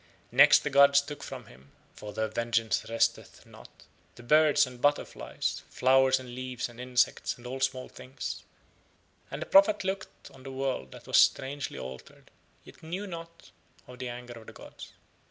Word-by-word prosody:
Next - - +7
the 150 - -2
gods 140 0 +6
took 145 0 -7
from 130 -3 -8
him, 65 -3 -19 0.2
for 105 - -9
Their 110 +1 -2
vengeance 115 -1 -1
resteth 115 0 -1
not, - - -16 0.3
the 120 - -13
birds 150 +3 +4
and 125 -1 -12
butterflies, 145 +1 -1
flowers 130 0 +3
and 125 -2 -10
leaves 130 -1 -4
and 120 0 -12
insects 125 0 0
and 120 - -16
all 130 +2 -5
small 130 -1 -1
things, 130 +2 -7 0.9
and - - -5
the - - -10
prophet 200 +1 +5
looked 190 0 -6
on 135 - -16
the 135 0 -9
world 130 - -3
that - - -13
was - - +2
strangely 135 - +1
altered, 65 0 -10 0.3
yet - - -16
knew 180 +6 -5
not 165 -2 -10 0.3
of 125 0 -13
the 125 -1 -4
anger 120 0 -8
of 110 - -17
the - - -11
gods. - - -12
130 Hz, 170 wpm, -29 LUFS, 120-140 Hz, 0.9 s, Next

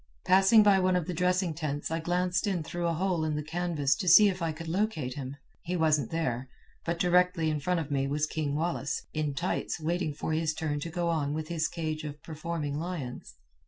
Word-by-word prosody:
"Passing 195 +4 +6
by 200 -2 +5
one 185 0 +2
of 180 -3 0
the 180 - -3
dressing 180 0 +1
tents 145 -1 -3
I 165 - 0
glanced 180 +3 0
in 180 -5 0
through 170 +2 -3
a 170 - +1
hole 175 -1 0
in 155 -1 -1
the 150 - -2
canvas 160 -3 0
to 190 - -4
see 205 +5 +8
if 185 -2 -4
I 165 -1 0
could 165 +1 -8
locate 165 -7 -1
him. 135 0 -6 0.2
He 180 +1 -3
wasn't 155 -6 +2
there, 130 -6 -2 0.3
but 170 0 -2
directly 180 -3 +3
in 150 - -1
front 175 +3 0
of 150 -2 -7
me 135 -1 +1
was 150 +2 0
King 150 -2 -2
Wallace, 160 -3 -2
in 150 -2 -1
tights, 175 +1 -2
waiting 160 -1 -1
for 155 - -3
his 160 0 0
turn 150 -2 -2
to 165 - -5
go 170 0 -1
on 150 -3 0
with 155 0 -4
his 160 -2 0
cage 155 -2 -4
of 150 -1 -6
performing 155 -2 -4
lions. 160 - -5
160 Hz, 220 wpm, -29 LUFS, 150-180 Hz, 0.3 s, see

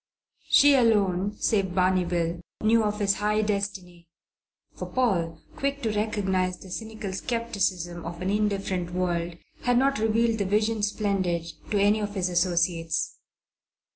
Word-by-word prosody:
She 285 0 +7
alone 205 -5 +2
(save 195 -4 0
Barney 185 -1 +3
Bill) 170 -1 -1 0.2
knew 225 +1 +4
of 210 0 -1
his 200 -1 +2
high 210 +1 +1
destiny 195 -4 -3 0.7
for - - -6
Paul, 175 -11 0 0.2
quick 280 0 -2
to 225 - +1
recognize 190 -4 0
the 190 - -13
cynical 220 -2 -5
scepticism 190 -6 -2
of 170 0 -6
an 185 +2 -1
indifferent 195 -4 -1
world, 175 -2 -1 0.2
had 245 -1 +2
not 275 -1 +2
revealed 225 +1 +1
the 200 - 0
Vision 215 +2 +1
Splendid 195 -5 0 0.2
to 205 - +1
any 205 +2 +4
of 205 -1 -4
his 185 -2 0
associates. 170 -2 0
200 Hz, 140 wpm, -26 LUFS, 180-215 Hz, 0.7 s, She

